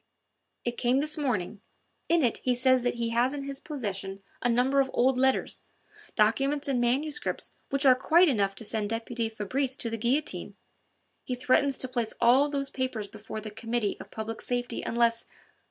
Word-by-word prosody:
"It 240 0 -2
came 250 +2 +3
this 305 +1 +1
morning. 220 - -2 0.5
In 335 -2 +4
it 235 - +2
he 250 -1 +1
says 255 +1 +4
that 245 0 0
he 235 -1 -1
has 240 +4 +1
in 280 - -4
his 275 0 -4
possession 200 - -4 0.2
a 245 - +1
number 255 +4 +3
of 270 -1 +2
old 260 +2 +3
letters, 265 +1 +1 0.5
documents 270 +7 +2
and 260 -3 +1
manuscripts 275 +5 -1 0.2
which 275 +1 0
are 260 - +9
quite 330 +8 +4
enough 200 -8 +1
to 225 - -5
send 210 -1 -1
deputy 225 0 -2
Fabrice 255 +5 -1
to 230 - -2
the 230 - -2
guillotine. 260 +7 -1 0.7
He 250 - -3
threatens 265 +2 +2
to 255 - -2
place 240 -3 -2
all 255 +5 +5
those 275 -1 -2
papers 255 -6 -3
before 215 +1 -8
the 215 0 -7
Committee 225 -1 -2
of - - -10
Public 220 +1 -5
Safety 245 -1 -2
unless 230 0 +1
245 Hz, 180 wpm, -28 LUFS, 225-270 Hz, 0.7 s, are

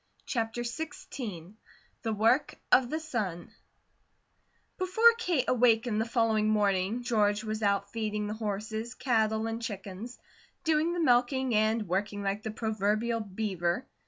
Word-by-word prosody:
CHAPTER 230 -1 -2
XVI 235 - -6 0.5
THE 225 - -2
WORK 225 +6 +2 0.2
OF 250 -2 +5
THE 315 - -1
SUN 215 - -4 1.3
BEFORE 445 +6 +5
Kate 340 - +1
awakened 230 -2 +3
the 225 - -3
following 220 -3 +2
morning 205 +2 +1
George 210 -3 +2
was 215 0 -3
out 200 -1 +1
feeding 210 -2 -2
the 210 - -3
horses, 220 +2 -4
cattle, 220 -4 +1
and 225 +1 -3
chickens, 205 +2 -6 0.5
doing 320 +1 +2
the 350 - -2
milking, 255 -2 +2
and 215 0 +2
working 200 +3 -2
like 200 +1 -1
the 220 - -4
proverbial 220 +1 0
beaver. 195 0 -2
220 Hz, 130 wpm, -29 LUFS, 210-245 Hz, 1.3 s, OF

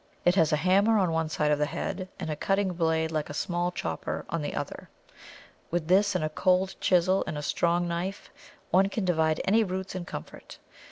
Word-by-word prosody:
It 175 - +5
has 165 -4 +3
a - - +4
hammer 195 +7 +3
on 185 -4 +2
one 160 -1 0
side 150 -1 0
of 150 - +2
the 150 - +1
head, 185 +3 -4
and 160 - -3
a - - -2
cutting 195 +2 0
blade 160 -1 0
like 155 -2 -2
a 145 - -6
small 175 +2 -1
chopper - - -4
on - - -1
the - - -4
other. - - -5 0.8
With 175 -1 -2
this 200 +2 +4
and 180 - 0
a 155 - 0
cold 185 +4 +1
chisel 185 +1 +3
and 150 - -3
a 150 - -4
strong 175 +4 +1
knife 175 +4 -4 0.4
one 190 +2 +4
can 205 -1 -2
divide 160 -3 +1
any 220 +4 +4
roots 190 -1 -4
in 185 -2 -5
comfort. - - -9
175 Hz, 210 wpm, -28 LUFS, 160-190 Hz, 0.8 s, It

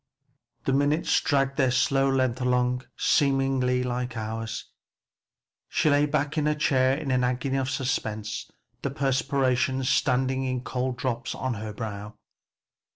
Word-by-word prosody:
The 135 - +1
minutes 145 +4 +2
dragged 135 -1 +1
their 130 -3 +3
slow 135 +2 +2
length 130 -2 +1
along 125 0 +1
seeming 135 -1 +2
like 125 -1 -1
hours. 110 0 -4 1.0
She 155 - +2
lay 145 +1 +4
back 150 +1 0
in 150 - +1
her 150 - +2
chair 130 -3 +2
in 150 -3 -3
an 125 -1 +2
agony 125 +2 0
of 130 0 -1
suspense, 110 -6 -3 0.3
the 140 - -1
perspiration 135 -1 +1
standing 130 0 +1
in 130 -1 -2
cold 125 0 -2
drops 125 0 -2
on 130 -1 -2
her 110 0 -5
brow. 105 -1 -6
130 Hz, 140 wpm, -26 LUFS, 125-135 Hz, 1.0 s, lay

